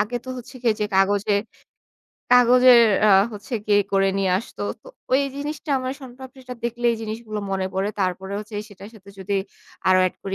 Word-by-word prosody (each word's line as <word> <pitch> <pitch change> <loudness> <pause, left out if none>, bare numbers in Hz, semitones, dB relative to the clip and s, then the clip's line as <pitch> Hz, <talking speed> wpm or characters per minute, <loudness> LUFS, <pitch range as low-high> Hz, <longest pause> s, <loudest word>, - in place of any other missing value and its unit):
আগে 215 +4 -1
তো - - -11
হচ্ছে 250 +1 -10
গিয়ে 230 -3 +2
যে - - +2
কাগজে 200 +2 +2 1.0
কাগজের 250 0 +7 0.3
আ - - +5 0.2
হচ্ছে 210 +4 -7
গিয়ে 205 -1 +4
করে 195 0 +3
নিয়ে 195 -1 +1
আসত। 230 - -11 0.2
তো - - -21 0.3
ওই 265 - +5 0.2
জিনিসটা 295 +2 -5
আমার 255 0 -3
শন 265 -3 -10
পাপড়ি 260 0 -12
টা 250 - -5
দেখলেই 240 0 0
এই 230 - -3
জিনিসগুলো 215 0 -5
মনে 190 -1 -1
পড়ে। 190 +2 0
তারপরে 190 +1 -2
হচ্ছে 215 +1 -9
সেটার 200 0 -12
সাথে 200 -2 -17
যদি 195 +1 -2 0.5
আরো 185 0 +5
এড 185 - -4
করি 195 -1 -4
215 Hz, 190 wpm, -22 LUFS, 195-250 Hz, 1.0 s, কাগজের